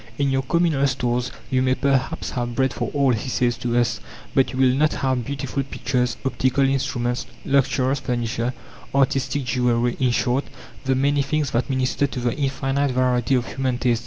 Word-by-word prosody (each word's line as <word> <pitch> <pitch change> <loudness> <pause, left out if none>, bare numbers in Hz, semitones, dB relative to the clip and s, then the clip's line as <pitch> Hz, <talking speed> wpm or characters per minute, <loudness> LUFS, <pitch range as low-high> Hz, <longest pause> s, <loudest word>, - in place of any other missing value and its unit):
"In 140 -1 +1
your 135 0 +2
communal 150 -1 +2
stores 125 -1 -1 0.2
you 130 -1 +2
may 130 0 +2
perhaps 140 +3 0
have 120 -1 -3
bread 130 0 +1
for - - -3
all," 140 -3 +2
he 115 +3 -3
says 120 -1 +1
to 120 0 0
us, 120 -1 +1 0.3
"but 135 - +3
you 130 - -6
will 130 -1 +4
not 150 +3 +2
have 130 -2 0
beautiful 140 -1 -3
pictures, 125 -2 -1
optical 135 +1 +2
instruments, 125 -2 -1 0.2
luxurious 135 0 +2
furniture, 120 -1 -1 0.4
artistic 135 +1 +1
jewelry 120 -1 +1
in 130 - +3
short, 125 +3 +1 0.4
the 130 0 +2
many 140 +2 +2
things 145 0 -1
that 120 +5 0
minister 130 +1 +1
to 130 - -5
the 120 -1 0
infinite 135 0 0
variety 125 0 +2
of 125 -1 0
human 130 -2 -2
tastes. 120 -2 +1
130 Hz, 180 wpm, -23 LUFS, 125-135 Hz, 0.4 s, will